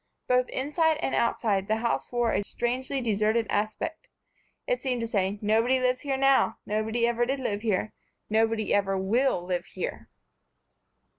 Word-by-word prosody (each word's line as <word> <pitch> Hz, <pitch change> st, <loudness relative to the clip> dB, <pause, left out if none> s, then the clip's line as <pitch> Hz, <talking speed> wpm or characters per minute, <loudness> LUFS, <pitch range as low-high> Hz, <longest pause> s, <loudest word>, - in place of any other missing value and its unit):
Both 250 Hz, 0 st, +2 dB
inside 310 Hz, +3 st, +1 dB
and -, -, -2 dB
outside 205 Hz, -4 st, +1 dB
the 220 Hz, -, +2 dB
house 235 Hz, +1 st, -1 dB
wore 240 Hz, -2 st, +1 dB
a -, -, +1 dB
strangely 255 Hz, +5 st, -2 dB
deserted 220 Hz, 0 st, +1 dB
aspect. 215 Hz, +10 st, -2 dB, 0.6 s
It -, -, -1 dB
seemed 255 Hz, -3 st, -1 dB
to 230 Hz, -, -2 dB
say: 200 Hz, -2 st, 0 dB
"Nobody 225 Hz, +5 st, +3 dB
lives 255 Hz, 0 st, +1 dB
here 275 Hz, -2 st, -1 dB
now, 270 Hz, 0 st, +3 dB
nobody 220 Hz, +3 st, 0 dB
ever 235 Hz, 0 st, +1 dB
did 265 Hz, +3 st, -1 dB
live 210 Hz, -5 st, -2 dB
here, 215 Hz, -1 st, -1 dB, 0.3 s
nobody 220 Hz, 0 st, +1 dB
ever 195 Hz, -1 st, +2 dB
will 210 Hz, +1 st, +1 dB
live 180 Hz, -1 st, -2 dB
here." -, -, -5 dB
235 Hz, 155 wpm, -27 LUFS, 215-260 Hz, 0.6 s, Nobody